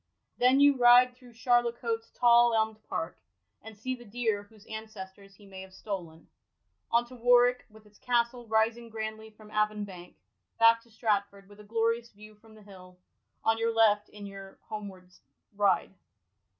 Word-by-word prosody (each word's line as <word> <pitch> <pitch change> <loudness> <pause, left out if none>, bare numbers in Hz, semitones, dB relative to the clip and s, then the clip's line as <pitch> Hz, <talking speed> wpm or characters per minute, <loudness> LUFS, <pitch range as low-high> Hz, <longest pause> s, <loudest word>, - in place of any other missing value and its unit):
Then 255 +2 +4
you 285 0 +6
ride 245 +1 +6
through 250 -1 -17
Charlecote*s 235 -2 0
tall 240 -1 +5
elmd 220 -1 0
park, 165 +2 -4 0.4
and 220 -1 -12
see 255 +5 -4
the 245 -1 -9
deer 220 -2 -2
whose 205 +1 -19
ancestors 200 -3 -10
he 205 - -18
may 190 -1 -10
have 190 0 -13
stolen; 175 -7 -7 0.6
on 235 +1 +2
to 255 - -13
Warwick, 245 +1 +3
with 215 0 -18
its 210 0 -22
castle 240 -1 -1
rising 225 +2 0
grandly 220 0 -6
from 215 0 -17
Avon 210 0 0
bank; 180 -3 -12 0.4
back 230 0 +5
to 235 - -25
Stratford, 200 -3 -2
with 205 +1 -17
a - - -12
glorious 230 +2 -1
view 215 +1 -15
from 220 +1 -20
the 215 - -16
hill, 185 -2 -15 0.5
on 225 0 +2
your 230 0 +1
left 210 -2 +3
in 205 -1 -11
your 195 -1 -11
home 210 -1 -5
ward 185 -2 -13 0.5
ride. 200 -3 +1
220 Hz, 170 wpm, -29 LUFS, 205-235 Hz, 0.6 s, you